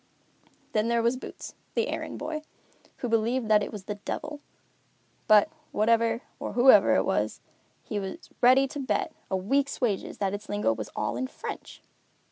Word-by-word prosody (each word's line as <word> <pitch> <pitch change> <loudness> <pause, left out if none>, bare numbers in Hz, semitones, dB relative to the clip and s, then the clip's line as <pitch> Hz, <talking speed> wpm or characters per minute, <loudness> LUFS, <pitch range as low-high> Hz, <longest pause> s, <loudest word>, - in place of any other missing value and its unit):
Then 215 +1 +1
there 235 0 +2
was 235 +2 +3
Boots, 255 - -8 0.2
the 465 +1 +1
errand - - -4
boy, 310 -1 -4 0.6
who 245 - -3
believed 230 +1 +1
that 210 -1 +6
it - - -3
was 210 -3 -7
the 205 +2 -5
Devil; 300 -1 -4 0.9
but, 210 -1 +7 0.2
whatever 230 +2 +2 0.2
or - - -4
whoever 250 +2 +7
it - - +2
was, - - 0 0.4
he 210 - -3
was 195 - -7
ready 260 +2 +6
to 290 - -6
bet 240 -7 -1 0.2
a 190 - +1
week's 275 +9 0
wages 215 -7 -1
that 195 -1 -1
its 205 +1 -6
lingo 205 - +1
was 110 -1 -6
all 110 +2 -1
in 130 +1 -1
French. - - -8
225 Hz, 170 wpm, -28 LUFS, 205-255 Hz, 0.9 s, but